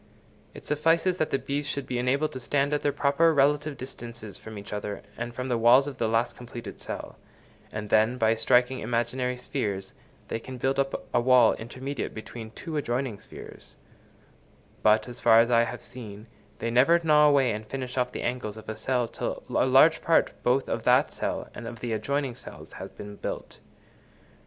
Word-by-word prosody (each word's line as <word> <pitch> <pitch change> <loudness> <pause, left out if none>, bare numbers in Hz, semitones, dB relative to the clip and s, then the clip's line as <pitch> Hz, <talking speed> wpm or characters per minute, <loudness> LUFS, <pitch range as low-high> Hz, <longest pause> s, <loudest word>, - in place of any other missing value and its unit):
It - - -11
suffices 165 +4 +2
that 155 - 0
the - - +1
bees 140 +2 -3
should 140 -2 -3
be 125 -1 -2
enabled 140 +5 +1
to 130 - -6
stand 140 +3 0
at 145 - +1
their 145 - +1
proper 145 +4 +3
relative 145 +1 +2
distances 115 -5 -8
from 110 -1 -9
each 100 0 -8
other 105 0 -4
and 120 0 -4
from 125 +2 -5
the 120 -2 0
walls 120 +4 +6
of 140 -3 -7
the 115 - +1
last 115 +2 +1
completed 120 -1 -9
cells, - - -6 0.6
and 105 -1 -6
then, 110 +3 +4
by 110 -2 +3
striking 125 +3 +3
imaginary 120 +2 -1
spheres, 105 -7 -3 0.3
they - - -3
can 130 +2 -8
build 135 +2 0
up 135 0 -1
a - - +4
wall 125 -2 +6
intermediate 130 +4 -5
between 110 +1 -8
two 155 +7 -6
adjoining 125 -5 -2
spheres; - - -12 1.1
but, 110 +1 +4
as 120 0 -9
far 115 -1 +7
as 115 +1 +3
I 115 0 +5
have 120 - -7
seen, 105 -4 -10 0.3
they 115 - -2
never 135 +8 +5
gnaw 150 -1 +6
away 135 -4 +4
and 105 0 -4
finish 130 +1 -5
off 125 -1 0
the - - -5
angles 120 -3 -3
of 110 - -11
a 110 - -4
cell 125 -1 0
till - - -4
a - - +2
large 145 +5 +6
part 165 - +3
both 130 +2 +2
of - - -2
that - - +3
cell - - -3
and 115 - -7
of 115 0 -7
the 120 -2 -3
adjoining 135 +4 -1
cells 125 - -10
has - - -7
been 105 0 -10
built. - - -6
125 Hz, 195 wpm, -27 LUFS, 115-140 Hz, 1.1 s, far